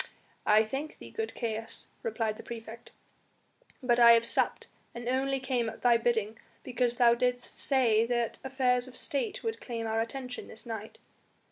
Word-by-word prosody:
"I 215 +1 +6
thank 270 +7 -5
thee, - - -11
good 445 0 -4
Caius," 225 -1 -4
replied 225 - -2
the - - -8
praefect, 230 0 -9 0.9
"but 245 -1 +3
I 235 -1 +9
have 230 0 +4
supped, - - +1 0.3
and 235 0 -6
only 270 +2 +1
came 255 -3 -1
at 225 - -11
thy 240 -1 +6
bidding, 225 -2 0 0.2
because 245 -1 0
thou 240 -1 +6
didst 245 +1 0
say 230 -5 +3
that 240 -1 -1
affairs 260 -2 +1
of 255 0 -9
State 335 +8 -1
would 450 0 -3
claim 230 -2 -4
our 225 0 0
attention 250 +2 -5
this 220 - -10
night." 220 -2 -6
240 Hz, 165 wpm, -30 LUFS, 225-260 Hz, 0.9 s, I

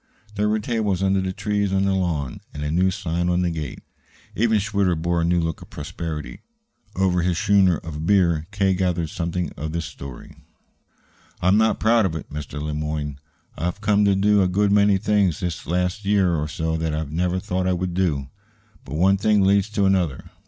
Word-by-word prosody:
There 105 0 0
were 110 - +2
tables 105 -4 -1
under 95 0 +2
the 95 0 -2
trees 100 +1 -1
on 95 0 +2
the 100 - +2
lawn, 85 -8 -2
and 75 - -4
a 75 - -2
new 90 +3 +3
sign 85 -1 -2
on 90 0 +1
the 85 - 0
gate. 80 -4 -6 0.5
Even 110 0 +3
Schwitter 100 -3 +1
bore 85 +1 0
a - - +1
new 85 +1 +2
look 80 -1 -2
of - - -12
prosperity. 80 -3 -6 0.5
Over 90 -2 +2
his 85 -1 0
schooner 95 -4 +4
of 80 0 -6
beer 85 -5 +3
K. 100 -2 +1
gathered 90 -3 -1
something 85 -1 -2
of 80 +1 -5
the 85 - -1
story. 70 -5 -9 1.0
"I'm 90 +3 +3
not 110 0 +2
proud 110 -2 +4
of 80 - -5
it, 80 - -7
Mr. 75 0 -6
Le 75 +1 -3
Moyne. 75 -2 -3 0.4
I've 90 +5 -3
come 105 -1 +3
to 100 -1 +4
do 100 +1 +3
a 95 - +3
good 100 +2 +1
many 100 -1 +4
things 100 -5 +1
the 90 -3 -4
last 90 +4 -1
year 100 -3 +2
or 75 -2 -1
so 80 +1 -2
that 80 -1 -2
I 80 - -1
never 90 +5 -1
thought 90 0 -2
I 90 - +2
would 90 0 -2
do. 80 -7 0 0.6
But 65 +2 -7
one 95 +5 +4
thing 105 0 +3
leads 100 +1 +3
to 105 -2 +1
another. 90 -7 0
90 Hz, 200 wpm, -23 LUFS, 80-100 Hz, 1.0 s, schooner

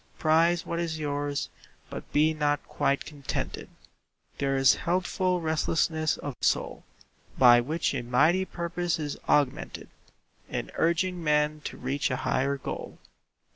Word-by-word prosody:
Prize 165 +2 +3
what 170 - -3
is 165 -2 -2
yours, 145 -1 -2 0.4
but - - -8
be 155 +2 +3
not 145 -1 0
quite 140 0 0
contented. 145 -3 -5 0.7
There 135 -1 +1
is 135 -1 +6
a - - -6
healthful 180 +1 0
restlessness 160 0 0
of 145 - -5
soul - - 0 0.5
By 120 -2 +7
which 155 +7 -1
a - - -2
mighty 150 +10 +3
purpose 175 -1 -2
is 150 -3 -3
augmented 145 -3 0 0.6
In - - -4
urging 175 +1 0
men 150 0 +1
to - - -5
reach 135 +3 -1
a 130 - 0
higher 140 +2 +1
goal. - - -6
155 Hz, 135 wpm, -27 LUFS, 140-170 Hz, 0.7 s, By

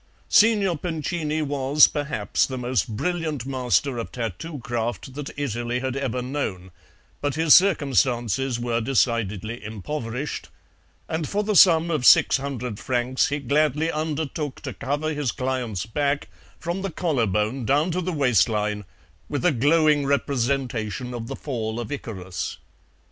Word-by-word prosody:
Signor 205 -7 +4
Pincini 155 -2 -2
was, 140 0 +4
perhaps, 145 -8 -1
the 130 - -5
most 125 -6 0
brilliant 160 -6 -2
master 130 -1 0
of 115 - -5
tattoo 125 - -5
craft 120 -1 -3
that 145 0 -6
Italy 120 -3 -2
had 130 0 -3
ever 130 -2 -2
known, 105 -9 -4 0.5
but 145 -2 -1
his 160 -1 +5
circumstances 135 - +3
were 120 -1 -1
decidedly 115 -3 0
impoverished, 115 +5 -5 0.6
and 160 -1 -2
for 205 +1 0
the 210 0 -1
sum 170 -1 +6
of 150 -5 0
six - - +7
hundred 125 -5 -5
francs 125 +1 +1
he 145 - -1
gladly 150 +3 +1
undertook 155 -2 -3
to - - -5
cover 145 +3 -2
his 145 -5 -1
client's 125 -7 -2
back, 140 +5 -1 0.3
from 175 +3 -3
the 195 - -2
collar 155 -9 0
bone 105 +6 -1
down 145 +8 +2
to 180 +2 -1
the 185 +1 -2
waistline, 105 - +1 0.4
with 145 +1 -2
a 180 - +5
glowing 145 +2 +3
representation 125 -4 -1
of 115 -2 -5
the - - -5
Fall 115 -5 -4
of 115 -3 -5
Icarus. 95 -10 -5
135 Hz, 145 wpm, -24 LUFS, 120-150 Hz, 0.6 s, six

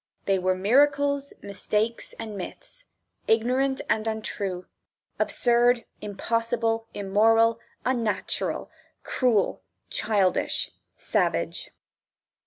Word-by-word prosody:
They 195 -1 +2
were 185 0 +1
miracles, 280 +7 +3
mistakes, 210 +3 -2
and 220 -2 -7
myths, 350 - -8 0.4
ignorant 255 +4 +2
and 220 0 +1
untrue, 200 -4 -3 0.5
absurd, 240 0 +3 0.2
impossible, 225 +2 -1
immoral, 225 +3 +3 0.3
unnatural, 235 -5 -1 0.3
cruel, 230 - +1 0.3
childish, 200 -4 +1 0.3
savage. - - -1
225 Hz, 75 wpm, -26 LUFS, 205-245 Hz, 0.5 s, miracles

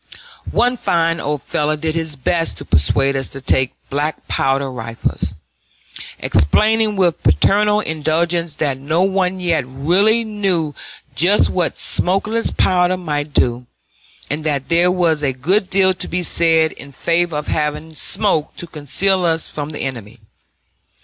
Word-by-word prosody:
One 245 +1 +1
fine 165 -4 0
old 150 -1 -3
fellow 150 +1 -1
did 155 +1 -2
his 160 -2 -1
best 165 +5 0
to - - -8
persuade 115 - +3
us 135 0 -1
to 135 - -8
take 130 -1 +1 0.2
black 150 +2 -3
powder 135 0 0
rifles, 115 -2 -3 0.8
explaining 215 - +2
with 180 -4 +1
paternal 210 +1 +3
indulgence 160 0 -1
that 140 -4 -2
no 155 +6 0
one 190 -1 0
yet 170 -5 0
really 180 - +2
knew 195 -8 -1 0.4
just 180 +9 +3
what 180 -2 -1
smokeless 210 +5 0
powder 180 0 +2
might 150 -4 -3
do, 120 -2 0 0.6
and 150 +2 -4
that 145 -3 -2
there 170 +1 +3
was 170 -4 +1
a 135 -3 0
good 180 +10 0
deal 190 -1 +4
to 180 - -4
be 180 +1 -2
said 160 -2 +3
in 140 - -12
favor 170 +3 0
of 150 - -4
having 150 +1 -3
smoke 155 0 +1
to - - -7
conceal 170 +5 0
us 165 -2 +1
from 150 -1 -6
the 155 - -7
enemy. 120 -4 -6
160 Hz, 150 wpm, -18 LUFS, 145-185 Hz, 0.8 s, deal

